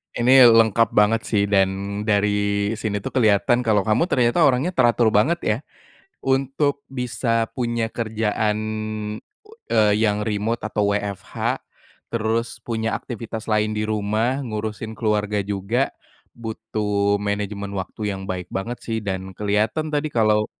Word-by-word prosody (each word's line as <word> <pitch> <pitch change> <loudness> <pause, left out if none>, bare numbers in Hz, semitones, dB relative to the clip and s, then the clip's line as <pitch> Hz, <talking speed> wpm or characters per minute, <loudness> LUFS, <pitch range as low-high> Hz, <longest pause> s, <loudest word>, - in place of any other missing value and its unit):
Ini, 125 +1 +7
lengkap 115 -1 +4
banget 105 +2 +4
sih, 105 -3 +2
dan 100 +1 +1
dari 100 0 +1
sini, 105 -2 -2
itu - - -4
kelihatan, 115 -1 +3
kalau 110 -5 +2
kamu 110 - +2
ternyata 125 -1 +2
orangnya 135 +6 +1
teratur 120 -6 +3
banget 140 +12 +3
ya. 105 - +1 0.7
Untuk 135 +2 0
bisa 120 -3 -1
punya 115 -1 -1
kerjaan, 110 -2 -1 1.1
eee, 105 -2 +4
yang 105 -1 +1
remote 105 +2 -1
atau 105 -2 0
WFH, 100 -2 -3 0.5
terus 115 +1 -1
punya 110 -2 -2
aktivitas 115 0 -6
lain 105 0 +2
di 105 - -1
rumah, 110 +4 0
ngurusin 110 -1 -4
keluarga 105 -2 0
juga, 100 +6 -1 0.5
butuh 105 -3 -1
manajemen 100 0 -3
waktu 105 +2 -4
yang 95 - -7
baik 90 -1 -4
banget 115 +6 -3
sih 115 -1 -2
dan 95 -1 -4
kelihatan 105 - 0
tadi, 150 0 0
kalau, 105 -2 +3
110 Hz, 130 wpm, -22 LUFS, 105-120 Hz, 1.1 s, Ini